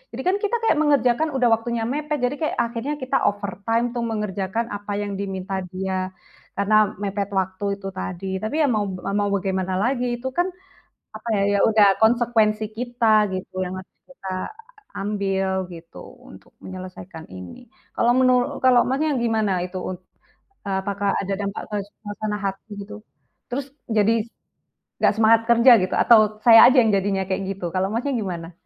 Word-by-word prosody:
Jadi -, -, -4 dB
kan 370 Hz, +2 st, +2 dB
kita 420 Hz, +2 st, -1 dB
kayak 445 Hz, -, +3 dB
mengerjakan, 285 Hz, -1 st, +2 dB
udah 250 Hz, -2 st, +3 dB
waktunya 225 Hz, +1 st, 0 dB
mepet, 295 Hz, +5 st, -2 dB
jadi 250 Hz, +3 st, +1 dB
kayak 310 Hz, -, -1 dB
akhirnya 235 Hz, +5 st, -3 dB
kita 270 Hz, -2 st, 0 dB
overtime 205 Hz, +4 st, -1 dB
untuk 240 Hz, -1 st, -3 dB
mengerjakan 210 Hz, 0 st, -2 dB
apa 205 Hz, 0 st, -6 dB
yang 200 Hz, -1 st, -4 dB
diminta 195 Hz, -1 st, -4 dB
dia 185 Hz, 0 st, -4 dB, 0.4 s
karena 210 Hz, +1 st, +2 dB
mepet 200 Hz, 0 st, -2 dB
waktu 190 Hz, +1 st, -1 dB
itu 195 Hz, -1 st, -8 dB
tadi. 190 Hz, 0 st, -5 dB
Tapi 220 Hz, +8 st, -4 dB
ya 290 Hz, -, +3 dB
mau 210 Hz, -3 st, 0 dB, 0.3 s
mau 205 Hz, -, +1 dB
bagaimana 190 Hz, -1 st, -1 dB
lagi, 245 Hz, +4 st, 0 dB
itu 260 Hz, +2 st, -5 dB
kan, 350 Hz, +6 st, 0 dB, 0.7 s
apa 220 Hz, -, -14 dB
ya, 200 Hz, -, +1 dB, 0.2 s
ya -, -, +1 dB
udah 210 Hz, -3 st, +5 dB
konsekuensi 220 Hz, -2 st, +2 dB
kita 230 Hz, -3 st, +2 dB
gitu, 185 Hz, 0 st, -6 dB
yang 180 Hz, -, -5 dB
harus -, -, -22 dB
kita 225 Hz, -8 st, -10 dB, 0.7 s
ambil 195 Hz, -2 st, -1 dB
gitu, 165 Hz, 0 st, -13 dB, 0.3 s
untuk 95 Hz, +1 st, -16 dB
menyelesaikan 185 Hz, -3 st, -9 dB
ini. 90 Hz, -, -10 dB, 0.3 s
Kalau 240 Hz, +1 st, +3 dB
menuru 255 Hz, -1 st, +2 dB
kalau 250 Hz, -2 st, +6 dB
Masnya 280 Hz, +2 st, 0 dB
gimana, 220 Hz, -6 st, 0 dB
itu 180 Hz, +1 st, -7 dB
un 185 Hz, -, -5 dB, 0.7 s
eee, 195 Hz, -1 st, -1 dB
apakah 200 Hz, +1 st, -1 dB
ada 195 Hz, 0 st, -2 dB
dampak 200 Hz, 0 st, -4 dB
ke 210 Hz, -, -2 dB, 0.3 s
suasana 210 Hz, 0 st, -4 dB
hati 195 Hz, +2 st, -5 dB
gitu? 210 Hz, +1 st, -10 dB, 0.5 s
Terus, 270 Hz, +2 st, -3 dB, 0.2 s
jadi 220 Hz, 0 st, +2 dB, 0.7 s
nggak -, -, +3 dB
semangat 225 Hz, 0 st, +5 dB
kerja 235 Hz, +2 st, +7 dB
gitu, 185 Hz, -, -2 dB
atau, 235 Hz, -, +6 dB, 0.3 s
saya 230 Hz, -1 st, +9 dB
aja 255 Hz, 0 st, +6 dB
yang 225 Hz, -, +2 dB
jadinya 195 Hz, 0 st, 0 dB
kayak 190 Hz, +1 st, -1 dB
gitu, 190 Hz, -2 st, -6 dB
kalau 185 Hz, +1 st, +1 dB
Masnya 245 Hz, +5 st, -1 dB
gimana? 175 Hz, -5 st, -5 dB
210 Hz, 165 wpm, -22 LUFS, 190-240 Hz, 0.7 s, saya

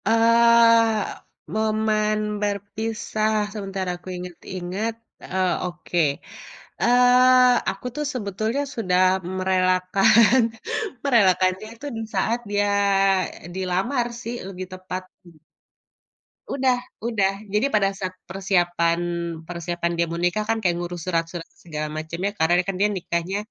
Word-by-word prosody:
Eee, 230 Hz, 0 st, +5 dB, 0.6 s
momen 215 Hz, 0 st, +1 dB, 0.2 s
berpisah, 215 Hz, +1 st, -2 dB, 0.2 s
sebentar 195 Hz, -3 st, -4 dB
aku 175 Hz, +1 st, -11 dB
inget-inget, 180 Hz, +4 st, -5 dB, 0.3 s
eee, 185 Hz, -1 st, 0 dB
oke. 175 Hz, 0 st, -3 dB, 0.8 s
Eee, 250 Hz, +1 st, +6 dB
aku 195 Hz, +4 st, -7 dB
tuh 300 Hz, -, -2 dB
sebetulnya 220 Hz, +3 st, -2 dB
sudah 185 Hz, -5 st, +1 dB, 0.4 s
merelakan 185 Hz, +5 st, +4 dB, 0.6 s
merelakanya 190 Hz, -5 st, +3 dB
itu 235 Hz, -, -11 dB
di -, -, -3 dB
saat 225 Hz, +5 st, +1 dB
dia, 205 Hz, 0 st, +1 dB, 0.8 s
eee, -, -, -9 dB
dilamar 190 Hz, +7 st, 0 dB
sih, 235 Hz, 0 st, -5 dB
lebih 185 Hz, -1 st, -6 dB
tepat 185 Hz, 0 st, -6 dB, 0.2 s
mhm. 165 Hz, -3 st, -18 dB, 1.1 s
Udah 260 Hz, -2 st, +2 dB, 0.3 s
udah. 200 Hz, -5 st, +1 dB, 0.2 s
Jadi 215 Hz, +7 st, +2 dB
pada 200 Hz, -5 st, +2 dB
saat 185 Hz, -1 st, -6 dB
persiapan 175 Hz, -3 st, +1 dB, 0.5 s
persiapan 170 Hz, 0 st, -3 dB
dia 170 Hz, 0 st, +1 dB
mau 170 Hz, -, -4 dB
nikah 175 Hz, +5 st, 0 dB
kan, 225 Hz, -, +2 dB
kayak 185 Hz, -6 st, 0 dB
ngurus 175 Hz, -1 st, -5 dB
surat-surat 165 Hz, -1 st, -2 dB
segala 155 Hz, -2 st, -6 dB
macamnya, 170 Hz, +6 st, -3 dB
karena 160 Hz, -3 st, +1 dB
kan 195 Hz, 0 st, -3 dB
dia 210 Hz, -, +4 dB
nikahnya, 180 Hz, -1 st, -2 dB
195 Hz, 115 wpm, -23 LUFS, 180-225 Hz, 1.1 s, Eee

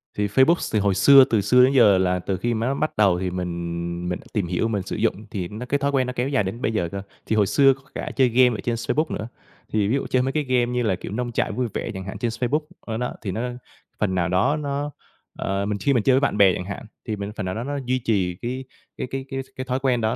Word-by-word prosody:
Thì 105 Hz, 0 st, 0 dB
Facebook 130 Hz, -, +3 dB
thì 110 Hz, -, +3 dB
hồi 100 Hz, -1 st, +2 dB
xưa 135 Hz, +7 st, +8 dB
từ 110 Hz, -4 st, +1 dB
xưa 125 Hz, +6 st, +5 dB
đến 130 Hz, +2 st, +4 dB
giờ 105 Hz, -7 st, +6 dB
là 90 Hz, -1 st, +1 dB
từ 95 Hz, +1 st, -2 dB
khi 120 Hz, +6 st, -1 dB
mà 115 Hz, +1 st, -1 dB
nó 135 Hz, -, +1 dB
bắt 155 Hz, +2 st, -2 dB
đầu 100 Hz, -4 st, +4 dB
thì 95 Hz, 0 st, -1 dB
mình 85 Hz, -1 st, -4 dB
mình 90 Hz, -, -2 dB
đã -, -, -16 dB
tìm 100 Hz, -5 st, 0 dB
hiểu, 90 Hz, +5 st, 0 dB
mình 105 Hz, -4 st, -1 dB
sử -, -, -5 dB
dụng, -, -, +1 dB, 0.2 s
thì 95 Hz, -4 st, -3 dB
nó 110 Hz, +6 st, -7 dB
cái 140 Hz, +3 st, +1 dB
thói 140 Hz, 0 st, 0 dB
quen 130 Hz, -2 st, +1 dB
nó 125 Hz, -, -3 dB
kéo 125 Hz, +2 st, -1 dB
dài 135 Hz, -6 st, +2 dB
đến 100 Hz, +6 st, -5 dB
bây 110 Hz, -, 0 dB
giờ 90 Hz, -6 st, -1 dB
cơ. 100 Hz, -, -4 dB, 0.2 s
Thì 110 Hz, -, 0 dB
hồi 105 Hz, -2 st, +3 dB
xưa 135 Hz, +3 st, +5 dB
có 135 Hz, -, -16 dB
cả -, -, -4 dB
chơi 130 Hz, -2 st, +4 dB
game 125 Hz, -1 st, +4 dB
ở -, -, -6 dB
trên 120 Hz, -, 0 dB
Facebook 150 Hz, +7 st, -1 dB
nữa, 110 Hz, -, -4 dB, 0.5 s
thì 105 Hz, -2 st, +2 dB
ví 115 Hz, -, +1 dB
dụ 140 Hz, -, -2 dB
chơi 130 Hz, -, +2 dB
mấy 130 Hz, +1 st, 0 dB
cái 150 Hz, +1 st, 0 dB
game 130 Hz, -3 st, +2 dB
như 125 Hz, 0 st, 0 dB
là, 105 Hz, -5 st, +1 dB
kiểu, 90 Hz, -, -8 dB
Nông 120 Hz, +3 st, -2 dB
trại -, -, 0 dB
vui 125 Hz, -1 st, -1 dB
vẻ -, -, -3 dB
chẳng 95 Hz, -1 st, -6 dB
hạn 95 Hz, +1 st, -6 dB
trên 115 Hz, +3 st, -1 dB
Facebook, 125 Hz, +6 st, 0 dB, 0.2 s
ờ, 110 Hz, -1 st, -5 dB
đó, 125 Hz, +1 st, -2 dB
thì 100 Hz, -, -3 dB
nó 110 Hz, -, -3 dB, 0.6 s
phần 95 Hz, -3 st, 0 dB
nào 90 Hz, -1 st, +1 dB
đó 95 Hz, +11 st, +2 dB
nó 145 Hz, 0 st, -3 dB, 0.5 s
ờ, 100 Hz, +1 st, -1 dB
mình 105 Hz, 0 st, -1 dB
khi 140 Hz, -, +2 dB
mình 120 Hz, -4 st, +2 dB
chơi 130 Hz, -, +4 dB
với -, -, +4 dB
bạn 140 Hz, -6 st, 0 dB
bè 95 Hz, -3 st, +6 dB
chẳng 90 Hz, -, -4 dB
hạn 100 Hz, +3 st, -6 dB, 0.2 s
thì 110 Hz, -, -1 dB
mình 100 Hz, 0 st, -5 dB
phần 105 Hz, -, -4 dB
nào 90 Hz, -, -3 dB
đó 115 Hz, -, -3 dB
nó 145 Hz, +2 st, -3 dB
duy 130 Hz, +1 st, +1 dB
trì 95 Hz, -6 st, +1 dB
cái 130 Hz, +2 st, -3 dB, 0.3 s
cái -, -, -3 dB
cái 135 Hz, 0 st, -4 dB
cái 135 Hz, 0 st, -3 dB
cái 130 Hz, -, -5 dB
thói 130 Hz, 0 st, -1 dB
quen 130 Hz, -3 st, +1 dB
đó 110 Hz, +2 st, +1 dB
115 Hz, 300 wpm, -23 LUFS, 95-130 Hz, 0.6 s, xưa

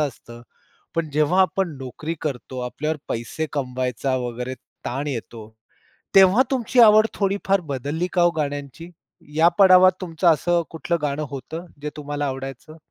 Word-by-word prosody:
असतं, 120 Hz, -5 st, -5 dB, 0.5 s
पण 165 Hz, -2 st, -1 dB
जेव्हा 155 Hz, +6 st, +3 dB
आपण 185 Hz, -3 st, 0 dB
नोकरी 135 Hz, +5 st, -5 dB
करतो, 130 Hz, -3 st, -4 dB
आपल्यावर 155 Hz, +5 st, -3 dB
पैसे 120 Hz, +7 st, -3 dB
कमवायचा 130 Hz, -1 st, -2 dB
वगैरे 125 Hz, +2 st, -4 dB, 0.3 s
ताण 140 Hz, +4 st, -3 dB
येतो, 115 Hz, -4 st, -6 dB, 0.7 s
तेव्हा 195 Hz, +6 st, +7 dB
तुमची 250 Hz, -1 st, +1 dB
आवड 215 Hz, -1 st, +7 dB
थोडीफार 195 Hz, -1 st, 0 dB
बदलली 145 Hz, +4 st, -3 dB
का 175 Hz, -, +2 dB
हो 175 Hz, -, +5 dB
गाण्यांची? 145 Hz, +2 st, -4 dB, 0.5 s
या 165 Hz, +2 st, +5 dB
पडावात 185 Hz, -1 st, +8 dB
तुमचं 170 Hz, 0 st, -1 dB
असं 170 Hz, +2 st, +3 dB
कुठलं 170 Hz, +1 st, -2 dB
गाणं 150 Hz, +1 st, -2 dB
होतं 155 Hz, +6 st, -7 dB, 0.2 s
जे 150 Hz, -, -3 dB
तुम्हाला 145 Hz, 0 st, -3 dB
आवडायचं? 135 Hz, +3 st, -7 dB
150 Hz, 140 wpm, -22 LUFS, 135-175 Hz, 0.7 s, पडावात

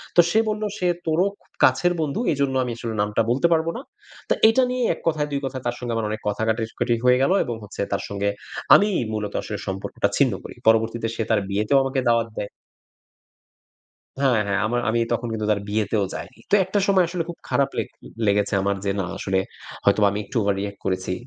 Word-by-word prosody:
তো 175 Hz, -, +9 dB
সে 215 Hz, -, +3 dB
বলল, 215 Hz, 0 st, -2 dB
"সে 180 Hz, -, 0 dB, 0.2 s
তোরও 160 Hz, +4 st, +3 dB, 0.2 s
খুব -, -, -31 dB, 0.2 s
কাছের 155 Hz, +8 st, +3 dB
বন্ধু। 155 Hz, +5 st, -1 dB
এইজন্য 140 Hz, -3 st, 0 dB
আমি 125 Hz, -, -3 dB
আসলে 115 Hz, -1 st, -4 dB
নামটা 105 Hz, +2 st, +1 dB
বলতে 135 Hz, +7 st, +3 dB
পারবো 160 Hz, 0 st, +1 dB
না।" -, -, -6 dB, 0.5 s
তা -, -, +5 dB
এইটা 225 Hz, +4 st, +4 dB
নিয়ে 250 Hz, 0 st, -1 dB
এক -, -, -11 dB
কথায় 155 Hz, -2 st, +1 dB
দুই 140 Hz, -, 0 dB
কথায় 130 Hz, -1 st, -5 dB
তার 120 Hz, -, -1 dB
সঙ্গে 120 Hz, -2 st, -3 dB
আমার 115 Hz, -1 st, -1 dB
অনেক 110 Hz, +1 st, -4 dB
কথা 105 Hz, +1 st, -1 dB
কাটাকাটি 115 Hz, +1 st, 0 dB
হয়ে 125 Hz, 0 st, +6 dB
গেল 135 Hz, -, +2 dB
এবং 120 Hz, -, -3 dB
হচ্ছে 105 Hz, -, -6 dB
তার -, -, 0 dB
সঙ্গে 100 Hz, 0 st, -1 dB, 0.5 s
আমিই 205 Hz, -2 st, +3 dB
মূলত 105 Hz, -1 st, -3 dB
আসলে 105 Hz, -, -5 dB
সম্পর্কটা 95 Hz, 0 st, -1 dB
ছিন্ন -, -, +3 dB
করি। -, -, -9 dB
পরবর্তীতে 115 Hz, +1 st, +3 dB
সে 115 Hz, -, -1 dB
তার 110 Hz, -, +4 dB
বিয়েতেও 105 Hz, +7 st, +2 dB
আমাকে 135 Hz, 0 st, -1 dB
দাওয়াত 115 Hz, -1 st, +2 dB
দেয়। 100 Hz, -, -3 dB, 1.7 s
হ্যাঁ, 135 Hz, -4 st, +3 dB
হ্যাঁ 100 Hz, 0 st, 0 dB
আমার 120 Hz, +2 st, 0 dB
আমি 115 Hz, +1 st, +2 dB
তখন 120 Hz, 0 st, -1 dB
কিন্তু 110 Hz, -1 st, -2 dB
তার 105 Hz, -1 st, +2 dB
বিয়েতেও 105 Hz, 0 st, 0 dB
যাইনি। 115 Hz, -, -8 dB
তো -, -, +5 dB
একটা 190 Hz, +3 st, -1 dB
সময় 190 Hz, -2 st, +4 dB
আসলে 175 Hz, 0 st, -2 dB
খুব 170 Hz, -, -7 dB
খারাপ 140 Hz, -1 st, +2 dB
লে -, -, +1 dB, 0.4 s
লেগেছে 100 Hz, 0 st, +2 dB
আমার 100 Hz, 0 st, 0 dB
যে 100 Hz, -, +1 dB
না -, -, -1 dB
আসলে, 95 Hz, -1 st, 0 dB, 0.5 s
হয়তোবা 100 Hz, +1 st, +4 dB
আমি 100 Hz, -, -3 dB
একটু 100 Hz, -, -9 dB
ওভার-রিঅ্যাক্ট 100 Hz, 0 st, -1 dB
করেছি। 95 Hz, -1 st, -1 dB
115 Hz, 205 wpm, -23 LUFS, 105-140 Hz, 1.7 s, তো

